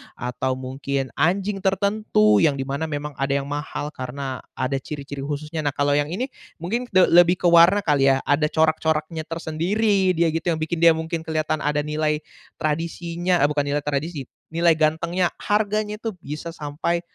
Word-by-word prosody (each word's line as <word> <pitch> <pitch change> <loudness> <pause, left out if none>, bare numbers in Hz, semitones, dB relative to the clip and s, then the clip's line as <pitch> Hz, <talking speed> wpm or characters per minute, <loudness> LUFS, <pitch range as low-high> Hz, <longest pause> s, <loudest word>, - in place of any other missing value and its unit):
Atau 125 +1 -2
mungkin 135 0 -3
anjing 195 +6 +1
tertentu 195 - +2
yang 150 -3 +4
di - - 0
mana 140 +4 -2
memang 145 -2 -5
ada 135 0 0
yang 140 +1 -6
mahal 145 0 -4
karena 130 0 -5 0.2
ada 135 +1 -1
ciri-ciri 140 0 -6
khususnya. 150 +2 -4
Nah 145 - 0
kalau 145 0 +1
yang 145 0 +1
ini 255 +8 -2 0.3
mungkin 230 +9 -2
de 185 0 +5
lebih 175 +1 +5
ke 180 - +3
warna 170 +4 +6
kali 145 -5 +2
ya. 135 - -1
Ada 145 +2 +3
corak-coraknya 160 0 0
tersendiri 185 +5 0
dia 170 0 +2
gitu 165 +2 -1
yang 160 - -4
bikin 160 +2 -2
dia 165 - +8
mungkin 160 0 -4
kelihatan 155 -1 -1
ada 150 0 +1
nilai 150 0 -1 0.4
tradisinya 170 +3 -1
eee, 145 - +4
bukan 145 -1 0
nilai 145 +1 0
tradisi, 145 0 -2 0.3
nilai 170 0 +4
gantengnya. 170 +3 +1
Harganya 210 0 0
itu 225 -3 -3
bisa 155 0 -7
sampai 160 +3 -2
155 Hz, 170 wpm, -23 LUFS, 145-175 Hz, 0.4 s, dia